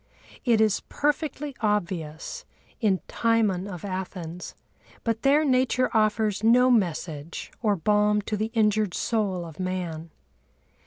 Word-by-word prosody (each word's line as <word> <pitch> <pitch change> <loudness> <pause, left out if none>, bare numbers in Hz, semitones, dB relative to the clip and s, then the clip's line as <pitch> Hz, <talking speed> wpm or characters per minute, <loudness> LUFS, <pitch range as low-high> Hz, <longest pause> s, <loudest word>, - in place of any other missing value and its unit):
It 235 -3 +4
is 215 -2 +3
perfectly 295 -1 -1
obvious 185 - -2 0.4
in 200 -5 +2
Timon 215 -5 +1
of 180 -2 -7
Athens—but 185 +4 -6
there 290 +3 +4
Nature 255 -1 +2
offers 215 -1 +1
no 250 +3 +5
message 170 -7 -1
or 210 -3 +2
balm 210 +3 +2
to 215 - -2
the 215 +2 -1
injured 210 -3 +2
soul 200 -6 -1
of 160 0 -11
man. 175 -3 -3
210 Hz, 115 wpm, -26 LUFS, 180-230 Hz, 0.4 s, no